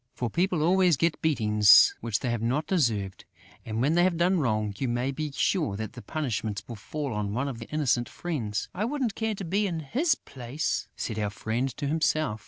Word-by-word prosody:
For 120 -3 -3
people 175 -2 +1
always 180 -2 +4
get 170 +2 0
beatings 105 -9 +6
which 115 -3 -1
they 125 - -1
have 120 -2 -2
not 130 +7 0
deserved; 110 - 0 0.4
and, 110 +1 -3
when 145 +5 +2
they 175 +1 +4
have 180 -2 +2
done 180 +2 +3
wrong, 110 -6 0
you 135 - 0
may 120 +3 0
be 150 +2 -4
sure 140 - 0
that 110 0 -5
the 125 - -9
punishment 110 -9 -3
will 120 - -6
fall 140 +5 -5
on 105 0 -2
one 130 +3 -1
of 130 -4 -5
their 115 - -8
innocent 135 -5 +1
friends. 125 -12 -3
"I 195 - -2
wouldn't 250 -2 -1
care 220 0 -2
to 195 - -6
be 200 +5 +1
in 165 -4 -3
his 275 - +1
place," 130 +4 -4
said 110 -2 -4
our 105 -1 0
friend 115 +5 -2
to 145 - -3
himself. 155 -5 0
140 Hz, 210 wpm, -27 LUFS, 110-170 Hz, 0.4 s, beatings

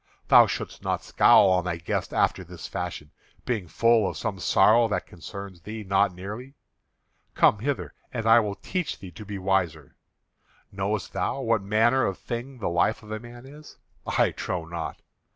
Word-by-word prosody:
Thou - - +8
shouldst - - -5
not - - -2
scowl 95 - +5
on 90 -1 +2
thy 90 -1 -2
guest 85 - -3
after - - +1
this - - -10
fashion, 75 -1 -5 0.3
being 110 -8 -2
full 115 +2 +3
of - - -7
some - - -3
sorrow 115 +2 +4
that 105 - -2
concerns 95 +1 -9
thee 110 +3 -7
not 100 0 +2
nearly. 105 +9 -8 0.8
Come 105 - +4
hither, 105 - -3 0.2
and 115 - -4
I 115 +1 +7
will 105 -3 -2
teach 180 - -3
thee 95 -2 -10
to 110 - -10
be 105 -1 -6
wiser. 90 -6 -1 0.8
Knowest 100 0 -3
thou 135 - -1
what 115 -4 +1
manner 115 +6 +3
of 95 - -3
thing 125 +3 -6
the 115 - -3
life 85 +6 +1
of 105 - -11
a 110 - -3
man 120 +2 -12
is? 150 +3 -13 0.3
I - - +2
trow 90 -2 -4
not. 85 0 -6
105 Hz, 175 wpm, -26 LUFS, 95-115 Hz, 0.8 s, Thou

